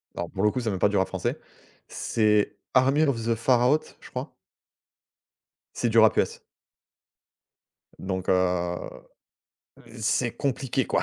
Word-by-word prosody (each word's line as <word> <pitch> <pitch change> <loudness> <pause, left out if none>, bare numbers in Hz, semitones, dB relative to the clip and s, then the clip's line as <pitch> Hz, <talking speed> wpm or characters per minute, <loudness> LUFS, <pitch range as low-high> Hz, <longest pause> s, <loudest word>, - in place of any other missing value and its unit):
Alors 85 - -4
pour 95 - -3
le 105 - +4
coup, 130 - -2
ç'est 115 - -2
même 95 -3 -3
pas 105 - +4
du 105 - 0
rap 95 - +2
français. - - -3 0.5
C'est 105 -2 +1 0.2
Army 135 +4 +4
of 140 -6 +1
the 115 0 +1
Pharaohs, 125 +5 +1
je - - -14
crois - - -6 1.4
c'est 120 - 0
du 115 0 +2
rap 110 -1 +6
US - - 0 1.6
donc, 95 -1 -4
heu 90 -1 +1 1.2
c'est 115 +2 0
compliqué 135 -1 -1
quoi - - +1
110 Hz, 140 wpm, -26 LUFS, 95-125 Hz, 1.6 s, rap